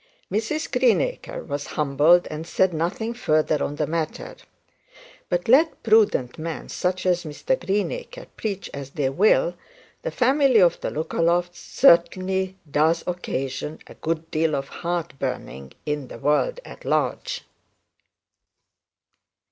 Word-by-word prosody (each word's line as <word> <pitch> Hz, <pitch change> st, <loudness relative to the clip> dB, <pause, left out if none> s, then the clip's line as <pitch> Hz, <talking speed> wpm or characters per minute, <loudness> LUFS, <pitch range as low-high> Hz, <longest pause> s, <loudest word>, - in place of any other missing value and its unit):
Mrs 230 Hz, +10 st, -2 dB
Greenacre -, -, +1 dB
was 145 Hz, -1 st, -4 dB
humbled, 150 Hz, +4 st, +4 dB
and 155 Hz, +2 st, -6 dB
said 185 Hz, 0 st, +2 dB
nothing 180 Hz, +8 st, -2 dB
further 155 Hz, -9 st, +1 dB
on 145 Hz, -, -3 dB
the 150 Hz, -, 0 dB
matter. 160 Hz, 0 st, -3 dB, 0.9 s
But 175 Hz, 0 st, -1 dB
let 295 Hz, +8 st, +4 dB
prudent 210 Hz, -, +3 dB
men, 165 Hz, 0 st, -5 dB
such 185 Hz, +1 st, -2 dB
as 180 Hz, -1 st, +2 dB
Mr 160 Hz, -, -2 dB
Greenacre, 210 Hz, -, -3 dB
preach 200 Hz, -3 st, -4 dB
as 140 Hz, -1 st, -6 dB
they 140 Hz, -1 st, -1 dB
will, 215 Hz, -, +3 dB, 0.5 s
the -, -, -3 dB
family 265 Hz, -, +3 dB
of 175 Hz, -3 st, +4 dB
the -, -, -2 dB
Lookalofts 170 Hz, +3 st, 0 dB
certainly 190 Hz, +2 st, +3 dB
does 160 Hz, +3 st, +2 dB
occasion 150 Hz, -4 st, -3 dB
a -, -, -12 dB
good 165 Hz, 0 st, -4 dB
deal 155 Hz, -1 st, +1 dB
of 135 Hz, 0 st, -4 dB
heart 170 Hz, -5 st, -4 dB
burning 70 Hz, -, -5 dB
in 150 Hz, -3 st, -2 dB
the -, -, -9 dB
world 150 Hz, -, +1 dB
at -, -, -11 dB
large. -, -, -1 dB
170 Hz, 130 wpm, -24 LUFS, 150-205 Hz, 0.9 s, humbled